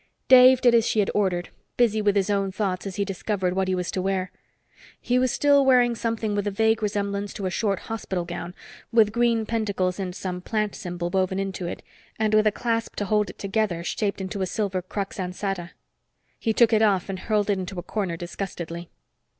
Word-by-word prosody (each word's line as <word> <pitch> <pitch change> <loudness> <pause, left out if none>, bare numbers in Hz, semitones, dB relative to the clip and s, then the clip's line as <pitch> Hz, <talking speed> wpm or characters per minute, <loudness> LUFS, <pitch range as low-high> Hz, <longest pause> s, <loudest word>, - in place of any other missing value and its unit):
Dave 255 0 +8
did 245 -2 +5
as 230 -1 +4
she - - 0
had 205 -2 +2
ordered, 185 -4 0 0.3
busy 220 -3 +3
with 205 -1 +2
his 200 0 +1
own 195 -1 0
thoughts 190 -1 -2
as 190 - -6
he 200 0 0
discovered 190 -1 -2
what 190 0 +1
he 185 - +1
was 180 -1 -2
to 185 - -2
wear. 190 0 -1 0.7
He 250 0 +1
was 255 -1 +2
still 285 +1 +4
wearing 250 -2 +4
something 225 -2 -2
with 205 0 -1
a - - +2
vague 220 +2 +2
resemblance 200 -1 -2
to 200 - -5
a 185 - -1
short 200 -1 -1
hospital 190 -5 -4
gown, 175 +1 -6 0.4
with 225 -3 +4
green 235 -1 +2
pentacles 200 -5 -1
and 185 -2 -4
some 180 -2 -4
plant 215 +1 -1
symbol 175 -3 -4
woven 190 0 0
into 195 -2 -3
it, - - -6 0.3
and 215 -1 0
with 215 0 +5
a - - +4
clasp 230 +1 -2
to 205 - -2
hold 210 +1 +1
it - - -11
together 200 -4 -1
shaped 200 +3 -2
into 190 +1 -4
a 190 - 0
silver 195 -2 -1
crux 195 +2 -5
ansata. 180 -1 -3 0.7
He 225 - 0
took 230 +1 +4
it 220 - +4
off 200 -4 +3
and 195 -1 -4
hurled 210 0 0
it 195 - 0
into 185 0 -6
a 175 - -4
corner 185 -3 -3
disgustedly. 170 -1 -6
200 Hz, 210 wpm, -25 LUFS, 185-220 Hz, 0.7 s, Dave